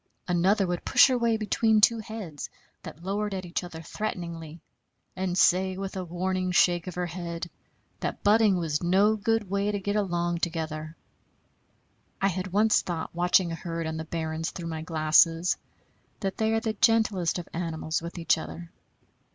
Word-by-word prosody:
Another 190 +3 +3
would 175 -1 -3
push - - +6
her 255 - +2
way 230 -1 +2
between 220 0 +2
two 230 +2 +5
heads 210 -9 -7 0.3
that 165 - -10
lowered 205 +1 -2
at 185 -1 -5
each 175 +1 -3
other 165 -2 -8
threateningly, 170 -5 -5 0.6
and 185 -1 -2
say 185 +1 +3
with 195 0 -5
a 190 - -3
warning 185 +1 -2
shake 175 -1 +3
of 180 - -5
her 180 0 -1
head 170 0 -5 0.5
that - - -4
butting 210 -2 +4
was 160 -3 -1
no 195 +5 +3
good 225 0 0
way 200 +2 0
to 205 - -2
get 205 +1 -2
along 175 -4 0
together. 160 -2 -3 1.2
I 195 - +2
had 185 0 -3
once 210 +4 +3
thought, 165 -3 -4
watching 175 0 +3
a - - -3
herd 165 -1 -4
on 160 0 -3
the 160 - -4
barrens 160 0 -3
through 170 -2 -6
my 160 -1 -4
glasses, 165 +2 +3 0.7
that 195 -2 -2
they 220 0 +1
are 225 - +2
the 225 -1 -2
gentlest 215 -6 +2
of 175 - -6
animals 165 -1 -2
with 170 +2 -7
each 165 -1 +2
other. 170 +1 -8
180 Hz, 175 wpm, -27 LUFS, 165-200 Hz, 1.2 s, push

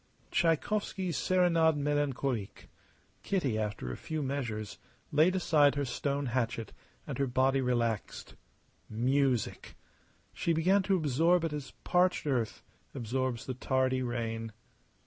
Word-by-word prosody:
Tschaikowsky's 185 +1 0
"Serenade 170 -1 +3
Melancolique." 140 -6 -2 0.5
Kitty, 140 - 0
after 105 - -3
a - - -4
few 155 -2 -4
measures, 120 -6 -4 0.3
laid 160 +5 +4
aside 150 -6 +4
her 145 -1 0
stone 140 +3 -2
hatchet, 115 -3 -2 0.3
and - - -5
her 140 - +2
body 130 +2 +2
relaxed. 120 -4 -1 0.6
Music! 130 +2 0 0.6
She 170 - 0
began 185 +5 +3
to 190 0 +1
absorb 165 +3 +2
it 165 -2 -1
as 145 -2 -6
parched 180 -1 +2
earth 125 -6 -1 0.3
absorbs 130 -1 -2
the 130 - -3
tardy 130 0 0
rain. 115 -2 -3
135 Hz, 120 wpm, -31 LUFS, 120-160 Hz, 0.6 s, laid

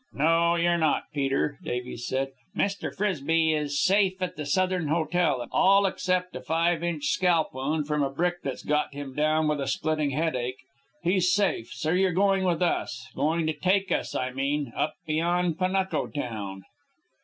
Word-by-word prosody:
"No, 165 +3 +3
you're 170 0 +2
not, 155 -2 +2
Peter," 140 0 0
Davies 125 -1 -4
said. 135 +1 -1 0.3
"Mr. 200 0 -1
Frisbie 165 -5 +1
is 145 -2 -1
safe 190 +3 +3
at 185 -2 -3
the 150 -1 -5
Southern 185 +1 +1
Hotel, 160 -4 +1
all 195 +1 +5
except 185 -1 -1
a 130 - -5
five 165 +4 +1
inch 165 -4 -2
scalp 175 -1 +2
wound 145 +4 -1
from 150 0 0
a 140 - +1
brick 175 +5 -1
that's 135 -2 -5
got 150 -1 0
him 140 -2 -6
down 155 +2 +2
with 150 -1 0
a 135 - -2
splitting 155 -2 0
headache. 130 -4 -1 0.5
He's 180 +1 +2
safe, 185 - +1
so 155 - -2
you're 185 0 +2
going 195 +1 +2
with 175 -1 +1
us, 120 -8 -2
going 160 +4 +1
to 155 - 0
take 190 +4 +1
us, - - -1
I 130 0 -1
mean, 140 0 -2
up 155 - -1
beyond 170 +2 0
Panuco 190 +1 0
town." 105 -9 -5
160 Hz, 170 wpm, -27 LUFS, 145-180 Hz, 0.5 s, all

